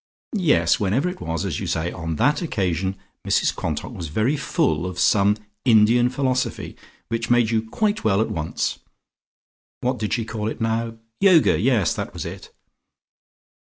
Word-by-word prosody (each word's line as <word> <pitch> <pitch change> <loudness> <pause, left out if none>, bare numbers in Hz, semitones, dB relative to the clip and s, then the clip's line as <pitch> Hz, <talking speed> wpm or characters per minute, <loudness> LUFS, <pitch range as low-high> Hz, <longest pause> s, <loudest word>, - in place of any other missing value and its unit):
"Yes; 175 - +3
whenever 110 - +1
it 180 - -8
was, 80 0 -3
as - - -2
you - - -4
say, 85 +1 -1
on 80 -1 -4
that 145 - +2
occasion 95 - -1 0.3
Mrs - - +1
Quantock - - -3
was 85 - -6
very 110 - +1
full 150 - 0
of 90 -1 -6
some 100 +3 +3 0.3
Indian 120 +1 +5
philosophy 130 -1 -2 0.3
which 115 0 -2
made 120 -2 +3
you 110 -1 +2
quite 215 - 0
well 100 -2 +2
at 110 - 0
once. 80 -1 -2 1.0
What 125 +1 -1
did 105 -1 -2
she 115 -3 -1
call 110 -1 -4
it - - -6
now? 115 0 -1 0.2
Yoga! 185 -5 +5
Yes, 115 -7 +2
that - - -5
was - - -5
it!" - - -8
115 Hz, 160 wpm, -22 LUFS, 100-130 Hz, 1.0 s, Indian